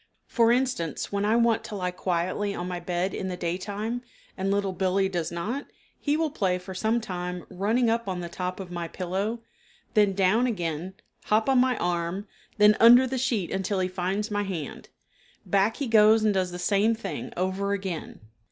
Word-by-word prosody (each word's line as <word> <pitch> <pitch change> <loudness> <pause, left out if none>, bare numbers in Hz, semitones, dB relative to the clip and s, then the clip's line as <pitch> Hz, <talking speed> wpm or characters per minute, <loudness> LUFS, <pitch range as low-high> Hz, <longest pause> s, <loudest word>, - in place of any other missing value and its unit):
For 230 -1 +3
instance, 245 - -1
when 200 0 0
I 215 +2 +3
want 230 -1 +3
to 210 - -6
lie 180 -2 -2
quietly 185 +3 -1
on 175 - -4
my 180 -1 -3
bed 180 +2 -2
in 190 - -3
the 180 -1 -4
day 175 -1 -1
time 210 +5 -4 0.3
and 190 +1 -2
Little 200 -1 0
Billee 190 +1 +1
does 175 -4 -2
not, 215 +12 -3 0.3
he 290 +1 +1
will 320 -2 0
play 190 -10 0
for 185 +1 -8
some 220 +5 +1
time 180 -4 -5
running 220 +6 +1
up 230 -1 0
on 185 -2 -2
the 175 - -4
top 180 +2 -4
of 185 -2 -7
my 170 -1 -4
pillow, 195 +7 -3 0.5
then 210 -3 +4
down 200 +6 +3
again, 175 -4 -3 0.3
hop 215 +3 +2
on 265 -2 +4
my 255 -2 +3
arm, 175 +3 -2 0.3
then 210 0 +6
under 240 +3 +8
the 260 0 -2
sheet 230 -8 0
until 190 +1 -1
he 185 - +1
finds 190 +4 -2
my 205 0 0
hand; 180 -8 -5 0.6
back 200 +3 +2
he 285 - -2
goes 220 -1 +5
and 215 -1 +3
does 185 -2 0
the 175 - -6
same 205 +5 +2
thing 195 -8 -6
over 190 +2 -1
again. 190 -5 -5
195 Hz, 195 wpm, -26 LUFS, 180-220 Hz, 0.6 s, under